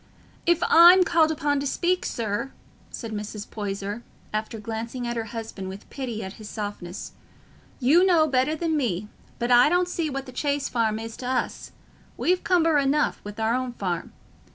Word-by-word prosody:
"If 345 -1 +3
I'm 350 +3 +8
called 330 -3 +3
upon 290 -2 0
to 280 - -2
speak, 360 +6 0
sir," 225 +3 -3 0.4
said 230 -2 -7
Mrs. 210 0 -5
Poyser, 205 +1 -4 0.3
after 215 +1 -3
glancing 230 +3 -5
at 240 0 -2
her 225 -1 -2
husband 220 -4 -6
with 190 +2 -9
pity 240 -5 -4
at 190 - -6
his 210 - -8
softness, 205 -4 -6 0.7
"you 295 +8 +5
know 345 -4 +5
better 270 +1 +1
than 320 0 -1
me; 210 - -1 0.3
but 240 +1 -1
I 245 +3 +7
don't 355 +2 +2
see 335 -3 -2
what 275 -1 -4
the 255 - -9
Chase 285 +2 -1
Farm 225 -3 0
is 225 0 -6
t' 250 - -6
us—we've 350 +6 -3
cumber 330 -5 +3
enough 285 +2 +1
wi' 205 - -7
our 220 +1 +1
own 255 0 -2
farm. 180 -7 -3
245 Hz, 175 wpm, -25 LUFS, 215-305 Hz, 0.7 s, I'm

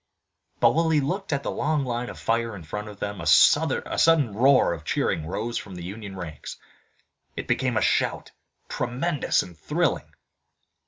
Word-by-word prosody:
But - - +5
while 165 0 +2
he 155 -2 +3
looked 180 +8 -3
at 140 -1 -1
the - - -2
long 150 -2 0
line 120 0 -3
of - - -9
fire 115 -1 -1
in 90 - -9
front 105 +7 -6
of 105 -1 -10
them 100 -2 -4
a 85 - -5
sudden 140 - +4
roar 130 -2 +4
of 80 -2 -8
cheering 80 0 -1
rose 115 +7 -3
from 95 -3 -10
the 90 - -7
Union 100 +2 -7
ranks. 80 -6 -8 0.8
It - - -5
became - - 0
a - - +2
shout, - - 0 0.4
tremendous 130 +5 -1
and 90 -2 -12
thrilling. 80 - -1
115 Hz, 170 wpm, -25 LUFS, 95-140 Hz, 0.8 s, But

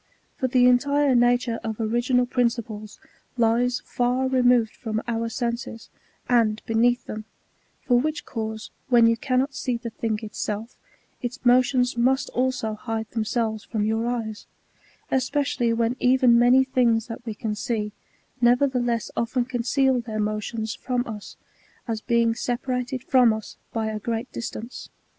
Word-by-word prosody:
^ - - -37
For 260 - +1
the 250 0 +4
entire 280 +3 +3
nature 245 -1 +2
of 220 -1 -4
original 240 +3 +1
principles 235 -4 -2 0.4
lies 240 +2 +2
far 250 +1 0
removed 245 -3 +3
from 220 -2 -3
our 230 -1 -1
senses, 235 -1 -4 0.4
and 225 -3 +3
beneath 240 +2 +2
them; 215 0 -6 0.6
for 245 -1 +3
which 310 +4 -2
cause, 220 -2 -5 0.2
when 240 -2 +6
you 230 0 +4
cannot 260 +3 0
see 250 -3 -2
the 235 -1 -7
thing 220 -1 -2
itself, 215 +1 -4 0.5
its 250 +1 -5
motions 250 0 +3
must 260 +3 +2
also 250 -3 -1
hide 220 0 -4
themselves 220 -1 -1
from 215 -3 -2
your 225 +2 0
eyes; 225 -3 -4 0.6
especially 265 -2 +1
when 230 +1 +1
even 250 -2 +5
many 250 +2 +6
things 240 -4 +2
that 235 +1 -8
we 225 -3 -5
can 215 0 -3
see, 210 0 -2 0.5
nevertheless 245 -1 +2
often 240 +1 0
conceal 255 +1 +1
their 220 -2 -5
motions 215 +1 -2
from 250 -1 -2
us, 215 -4 -8 0.5
as 225 -2 -2
being 235 0 +2
separated 250 +2 -3
from 250 -4 +5
us 220 -1 -5 0.2
by 225 -1 -2
a 215 0 -3
great 230 +3 -3
dis 235 - -4
tance. 235 +3 -8
240 Hz, 150 wpm, -24 LUFS, 225-250 Hz, 0.6 s, when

